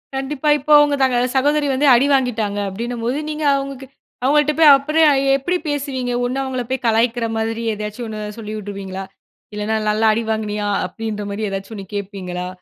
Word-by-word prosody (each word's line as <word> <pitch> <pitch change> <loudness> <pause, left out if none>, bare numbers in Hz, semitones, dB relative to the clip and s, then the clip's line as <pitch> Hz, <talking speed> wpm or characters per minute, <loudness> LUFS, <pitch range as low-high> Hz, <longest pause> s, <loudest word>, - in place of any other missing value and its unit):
கண்டிப்பா. 270 +2 -2
இப்போ 295 +3 -3
அவுங்க 290 -1 +3
தங்க 260 -2 +3 0.2
சகோதரி 290 +2 +2
வந்து 280 +3 +1
அடி 245 +4 +4
வாங்கிட்டாங்க 225 -6 0
அப்பிடின்னும்போது, 235 +5 -3
நீங்க 305 0 -4
அவுங்கக்கிட்ட, 275 -1 -5 0.3
அவுங்கள்ட்ட 295 +2 +3
போய் 310 -3 +8
அப்புறம் 305 +3 +2 0.3
எப்பிடி 350 +7 -1
பேசுவீங்க? 270 -4 -2
ஒன்னு 255 +2 -2
அவுங்களப் 255 -2 -4
போய் 260 -1 -2
கலாய்க்கிற 230 +1 +2
மாதிரி 225 +1 -2
ஏதாச்சும் 210 +3 -5
ஒண்ணு 215 -1 -6 0.2
சொல்லி 215 -1 -6
விட்ருவீங்களா? 195 -2 -6 0.5
இல்லன்னா 210 +1 -1
நல்லா 215 +1 +1
அடி 230 +1 -1
வாங்கினியா! 210 -1 -2 0.2
அப்பிடின்ற 210 +2 -5
மாரி 210 +1 -3
ஏதாச்சும் 195 +3 -6
ஒண்ணு 195 -2 -7
கேட்பீங்களா? 185 -3 -5
235 Hz, 160 wpm, -19 LUFS, 210-275 Hz, 0.5 s, போய்